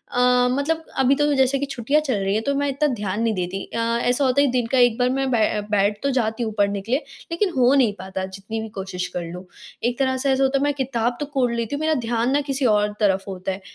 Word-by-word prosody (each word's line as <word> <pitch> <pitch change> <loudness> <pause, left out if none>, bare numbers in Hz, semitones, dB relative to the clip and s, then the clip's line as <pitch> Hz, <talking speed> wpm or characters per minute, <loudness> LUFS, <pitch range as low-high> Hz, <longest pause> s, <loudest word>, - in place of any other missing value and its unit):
अ, 250 0 +4
मतलब 315 +5 -1 0.2
अभी 265 +1 +4
तो 295 0 +2
जैसे 265 0 +3
कि 285 - -1
छुट्टियाँ 275 +2 0
चल 285 -4 -1
रही 195 +1 0
है, 215 - +1
तो 280 +5 -1
मैं 285 0 0
इतना 285 +2 +1
ध्यान 205 -1 -3
नहीं 225 -1 +1
देती 185 +1 -3
अ, - - -7 0.3
ऐसा 250 +3 +2
होता 260 +2 +3
है 285 - +4
कि - - 0
दिन 245 -2 +1
का 260 - +2
एक 245 -2 +4
बार 250 0 +2
मैं 270 +1 0
बै 215 -2 +2
बैठ 205 0 +2
तो 280 - +1
जाती 225 0 0
हूँ 220 - -2
पढ़ने 200 -1 +1
के 225 - -9
लिए, 265 - +3 0.3
लेकिन 370 +3 +1
हो 255 +1 +5
नहीं 245 -7 +3
पाता, 190 0 -4
जितनी 195 +4 -6
भी 220 - -6
कोशिश 190 -2 -4
कर 175 - -2
लूँ। 180 +1 -8 0.4
एक 240 0 0
तरह 260 -1 +1
से 275 +2 -1
ऐसा 265 +1 +2
होता 270 +1 +2
है 275 - 0
मैं 290 0 +1
किताब 240 -3 -1
तो 295 - -2
कोड़ 270 -4 0
लेती 235 +3 -2
हूँ, - - -4
मेरा 315 0 +2
ध्यान 235 +2 0
ना 285 - +2
किसी 270 -1 0
और 210 -2 +3
तरफ 195 -2 +2
होता 190 0 -4
है। 190 +1 -6
245 Hz, 275 wpm, -22 LUFS, 210-275 Hz, 0.4 s, हो